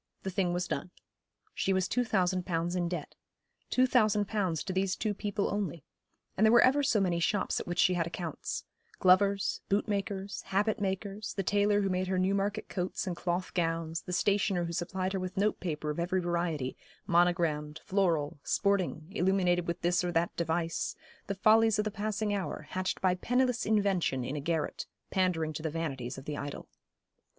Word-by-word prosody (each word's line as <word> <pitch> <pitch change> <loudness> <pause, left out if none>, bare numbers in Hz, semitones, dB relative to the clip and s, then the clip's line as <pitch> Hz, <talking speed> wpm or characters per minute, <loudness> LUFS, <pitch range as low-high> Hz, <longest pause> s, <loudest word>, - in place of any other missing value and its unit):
The 190 - -3
thing 180 -1 +1
was 175 0 -1
done. 140 - -3 0.6
She 195 - 0
was 190 -1 +1
two 250 - +1
thousand 185 -5 +1
pounds 175 0 -1
in 175 -1 0
debt 170 -4 -5 0.6
two 255 - +4
thousand 215 -5 +3
pounds 185 -7 -1
to 190 - -4
these 190 0 +1
two 215 -2 -1
people 205 0 -2
only 190 -7 -3 0.5
and 200 - +1
there 220 - +6
were 240 - +7
ever 270 +3 +4
so 245 -6 +2
many 180 -3 +1
shops 200 +4 +1
at - - -6
which 175 0 -3
she 185 - +4
had 170 -2 0
accounts 170 -1 -4 0.3
glovers, 195 +1 +3
bootmakers, 200 -1 -1
habit 210 +3 +1
makers, 200 +1 -3
the 195 - -1
tailor 205 +1 +3
who 195 - 0
made 185 0 0
her 185 0 0
Newmarket 200 +3 0
coats 180 +1 -3
and 180 -2 -2
cloth 180 +1 -2
gowns, 165 -1 -1
the 180 - -8
stationer 195 -1 +1
who 170 - -4
supplied 185 +2 -2
her 190 - -1
with 185 +1 -5
note 210 +2 +1
paper 155 -3 -2
of 150 - -5
every 180 +2 +1
variety, 170 -6 -1 0.3
monogrammed, 170 -3 +2
floral; 165 -7 +1
sporting, 195 -6 0
illuminated 180 -3 +2
with 170 0 -3
this 175 +1 +2
or 175 - -1
that 170 0 0
device, 165 0 -1 0.3
the 200 - -2
follies 220 +2 +5
of 210 - +1
the 215 - -1
passing 215 0 -1
hour, 195 -2 -3
hatched 185 0 -2
by 185 -1 +3
penniless 250 +5 +1
Invention 195 - +1
in 135 - -3
a 145 - -3
garret, 160 +1 -2 0.2
pandering 175 -5 +1
to 150 - -5
the 160 - -1
vanities 140 -6 -4
of 135 - -9
the 150 -1 -4
idle. 145 0 -6
185 Hz, 185 wpm, -31 LUFS, 170-200 Hz, 0.6 s, were